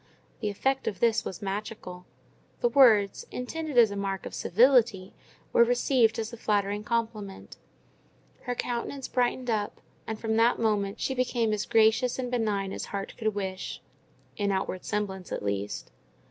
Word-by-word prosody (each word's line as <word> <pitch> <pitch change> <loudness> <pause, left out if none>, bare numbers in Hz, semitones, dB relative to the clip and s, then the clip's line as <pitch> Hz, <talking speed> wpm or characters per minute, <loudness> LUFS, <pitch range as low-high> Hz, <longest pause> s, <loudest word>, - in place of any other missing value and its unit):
The 210 - -1
effect 265 +7 -1
of 195 - -2
this 230 -1 +3
was 190 -2 -6
magical: 195 -2 -5 0.5
the 485 - +2
words, 220 - +5
intended 300 +2 -4
as 230 -3 +7
a - - -4
mark 195 -2 -3
of - - -7
civility, 225 -3 +3 0.4
were 235 - +7
received 245 -1 +3
as 225 +1 -4
a - - -7
flattering 205 -1 0
compliment; 215 -3 -3 0.9
her 245 -1 -2
countenance 245 +3 -3
brightened 250 0 0
up, 210 -2 -2 0.3
and 220 -1 -4
from 220 -1 -1
that 230 +2 +4
moment 205 -3 0
she 265 - -1
became 245 -3 0
as 210 -1 -2
gracious 225 +3 +3
and 250 -1 -3
benign 210 -5 0
as - - -4
heart 195 -1 -5
could 215 -2 -1
wish—in 200 +1 -5
outward 190 -1 -2
semblance 195 -3 -3
at - - -3
least. 100 0 -3
220 Hz, 155 wpm, -28 LUFS, 200-240 Hz, 0.9 s, as